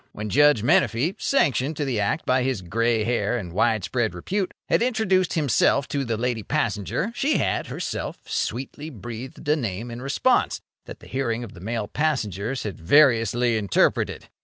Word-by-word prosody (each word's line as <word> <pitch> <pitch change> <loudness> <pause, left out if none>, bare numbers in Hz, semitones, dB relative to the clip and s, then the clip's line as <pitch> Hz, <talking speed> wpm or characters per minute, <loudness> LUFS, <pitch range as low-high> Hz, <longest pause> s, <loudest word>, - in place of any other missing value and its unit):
When 105 0 -5
Judge 145 -4 +5
Menefee— 120 - +2
sanctioned 145 - +1
to 150 - -1
the 125 -5 -1
act 105 +10 -1
by 130 0 +2
his 125 -7 -1
grey 115 +5 +1
hair 120 0 0
and 90 -7 -6
widespread 110 0 0
repute—had 190 - -2
introduced 220 -7 +1
himself 140 -2 +2
to 140 -1 -1
the 115 -3 -2
lady 120 -1 -1
passenger, 115 - -1
she 280 +5 +1
had, - - -1
herself, - - -4
sweetly 135 +5 -3
breathed 120 +2 -8
a 150 - +4
name, 115 -4 -4
in 120 +1 -7
response, 135 +1 +1 0.3
that - - -10
the - - -13
hearing 120 -3 -2
of 115 - -9
the 85 - -13
male 110 +1 -3
passengers 125 - -1
had 105 -3 -5
variously 120 - +4
interpreted. 100 -3 +1
120 Hz, 160 wpm, -24 LUFS, 110-145 Hz, 0.3 s, Judge